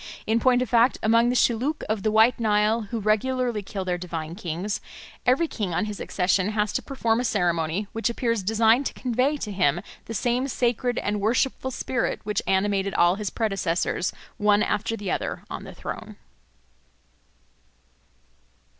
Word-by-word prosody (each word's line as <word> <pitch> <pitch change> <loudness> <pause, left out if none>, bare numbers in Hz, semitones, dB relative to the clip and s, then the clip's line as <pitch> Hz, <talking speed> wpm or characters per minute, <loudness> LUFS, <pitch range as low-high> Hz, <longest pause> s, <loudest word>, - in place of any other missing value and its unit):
In 225 +1 +2
point 250 0 +3
of 250 - -6
fact, 240 +1 +4
among 230 +2 +4
the 250 - 0
Shilluk 250 +6 +1
of 215 -1 -1
the 215 - +1
White 220 +3 +4
Nile, 215 0 +2
who 230 - -2
regularly 230 +2 0
kill 195 -1 -5
their 180 -1 -1
divine 165 -2 -5
kings, 180 +2 -3 0.5
every 270 +7 +4
king 200 - -3
on 215 - +1
his 210 -1 -6
accession 185 +1 +1
has 210 -2 0
to - - 0
perform 235 -4 0
a - - 0
ceremony 175 -3 0
which 225 0 -1
appears 230 -2 0
designed 225 +6 +3
to - - -7
convey 255 +4 +1
to 215 -6 -5
him 175 -5 +2 0.3
the 225 - -6
same 245 +5 0
sacred 245 -1 0
and 205 0 -1
worshipful 255 +4 +1
spirit 255 -1 -2
which 210 0 -1
animated 195 0 +1
all 175 +1 +5
his 205 0 -3
predecessors, 190 -5 -1 0.3
one 210 0 +3
after 225 +2 -1
the 200 -3 -4
other, - - -3
on - - -6
the - - -10
throne. - - -7
215 Hz, 165 wpm, -25 LUFS, 195-240 Hz, 0.5 s, all